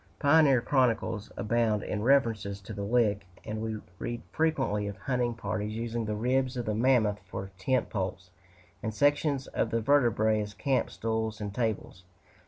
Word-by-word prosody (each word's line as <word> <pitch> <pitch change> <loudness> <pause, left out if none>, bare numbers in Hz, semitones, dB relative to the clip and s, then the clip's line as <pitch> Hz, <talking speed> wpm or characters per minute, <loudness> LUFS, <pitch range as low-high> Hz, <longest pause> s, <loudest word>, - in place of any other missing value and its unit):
Pioneer 145 -4 +5
chronicles 115 -5 +1
abound 110 -1 +1
in 105 - -3
references 115 -6 +2
to 100 +3 -8
the 100 - -5
Lick, 105 -2 +1 0.2
and 110 0 -4
we 110 -1 -2 0.2
read 120 0 -4
frequently 135 -10 0
of 100 0 -6
hunting 125 -3 -1
parties 110 -2 -3
using 115 0 -2
the 105 0 -2
ribs 130 +3 0
of 120 - -2
the 110 - -1
mammoth 110 -3 +3
for 95 0 -6
tent 130 +4 0
poles, 95 -2 -3 0.5
and 110 -3 -3
sections 145 0 +2
of - - -1
the 115 - 0
vertebræ 110 -4 +3
as 105 0 -6
camp 135 -2 0
stools 110 -1 -2
and 105 -2 -4
tables. 110 -5 -2
115 Hz, 165 wpm, -29 LUFS, 105-125 Hz, 0.5 s, Pioneer